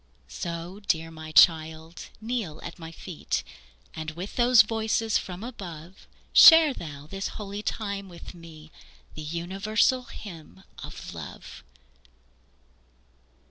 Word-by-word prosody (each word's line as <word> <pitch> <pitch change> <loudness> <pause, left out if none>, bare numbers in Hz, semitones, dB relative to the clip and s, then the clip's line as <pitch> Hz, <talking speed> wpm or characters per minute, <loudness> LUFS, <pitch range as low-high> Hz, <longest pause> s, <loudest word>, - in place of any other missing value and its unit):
So, 170 +2 -6
dear 165 -2 0
my 155 -1 -9
child, 160 +1 +3
kneel 220 -9 -3
at 175 - -8
my 165 -1 -8
feet, 165 0 -4 0.5
And 155 0 -5
with 175 +6 -7
those 245 -1 +7
voices 220 0 0
from 180 +2 -7
above 185 -7 -9 0.3
Share 320 -3 +9
thou 145 - -8
this 195 +5 -4
holy 205 0 -5
time 200 -3 -4
with 170 -1 -11
me, 160 -3 -13 0.4
The 155 - -8
universal 195 +10 0
hymn 180 -4 -11 0.2
of - - -8
love. - - -9
180 Hz, 115 wpm, -27 LUFS, 160-215 Hz, 0.5 s, Share